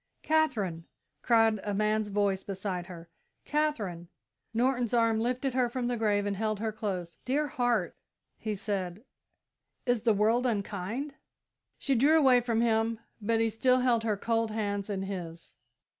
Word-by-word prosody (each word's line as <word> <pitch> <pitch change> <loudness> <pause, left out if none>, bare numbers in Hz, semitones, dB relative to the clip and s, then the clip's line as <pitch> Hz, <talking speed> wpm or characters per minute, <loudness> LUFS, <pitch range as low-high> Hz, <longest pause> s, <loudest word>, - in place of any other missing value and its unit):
"Katherine!" 225 - +1 0.4
cried 225 0 +4
a 205 -1 -3
man's 215 +1 +1
voice 200 -2 0
beside 190 -2 -4
her; 170 -2 -10 0.4
"Katherine!" 220 - -1 0.4
Norton's 245 0 +1
arm 230 -1 +3
lifted 250 +3 -1
her 250 -1 +2
from 245 0 -3
the 245 0 0
grave 210 -3 +1
and 200 -1 -1
held 215 0 -1
her 220 0 -1
close. 190 -6 -4
"Dear 285 +4 +1
heart," 245 -2 0 0.4
he 215 -1 -3
said, 195 -1 -3 0.8
"is 245 -3 +1
the 225 -1 +3
world 225 +5 +3
unkind?" 215 +5 -3 0.6
She 275 - 0
drew 285 +6 +5
away 260 -5 +5
from 230 -2 0
him, 225 -1 +1 0.2
but 225 +2 +1
he 225 0 +2
still 255 +3 +3
held 240 -3 +2
her 215 -3 0
cold 230 +1 0
hand 205 -2 -2
in 195 -2 -2
his. 175 -4 -7
220 Hz, 155 wpm, -29 LUFS, 200-245 Hz, 0.8 s, drew